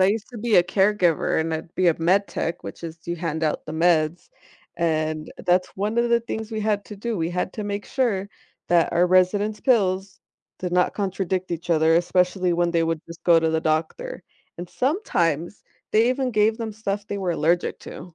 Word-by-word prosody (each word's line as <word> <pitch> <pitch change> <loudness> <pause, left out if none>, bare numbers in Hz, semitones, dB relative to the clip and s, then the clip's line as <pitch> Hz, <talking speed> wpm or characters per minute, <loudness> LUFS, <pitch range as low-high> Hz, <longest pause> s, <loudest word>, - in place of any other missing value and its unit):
I 185 - +6
used 210 +1 -1
to 240 - -8
be 225 0 +2
a 175 - +7
caregiver 190 -2 +2
and 160 0 -1
I'd 160 +1 -5
be 185 - +1
a 165 - +1
med 190 +5 +3
tech, 170 +2 -3
which - - -8
is 165 0 -7
you 170 - -2
hand 160 -2 -3
out 155 - -2
the 155 - -6
meds, 160 0 +1 0.5
and 155 -2 -1
that's 180 0 0
one 210 +4 -1
of 235 - +2
the 235 0 +3
things 220 -1 -5
we 220 -1 -3
had 210 -1 0
to 210 - -9
do. 225 +1 -3
We 165 0 0
had 180 +1 -2
to 215 - -4
make 205 0 -3
sure 225 -8 0 0.4
that 175 -1 +3
our 175 +1 +3
residents' 200 +4 +2
pills 195 -6 +1 0.4
did 180 -1 -3
not 180 0 +2
contradict 190 -2 -2
each 170 0 -5
other, 160 -1 +4
especially 180 +1 +1
when 175 0 +1
they 170 -1 +2
would 165 -1 -2
just 170 0 -11
go 170 -2 +6
to 160 0 +1
the 160 0 0
doctor. 160 - -2 0.3
And 175 +1 -7
sometimes 175 - -1 0.3
they 225 +2 +4
even 255 0 0
gave 215 0 +2
them 225 -2 -4
stuff 205 -1 -4
they 200 - -4
were 185 -3 -1
allergic 170 +2 0
to. 175 -2 -10
180 Hz, 210 wpm, -23 LUFS, 170-210 Hz, 0.5 s, a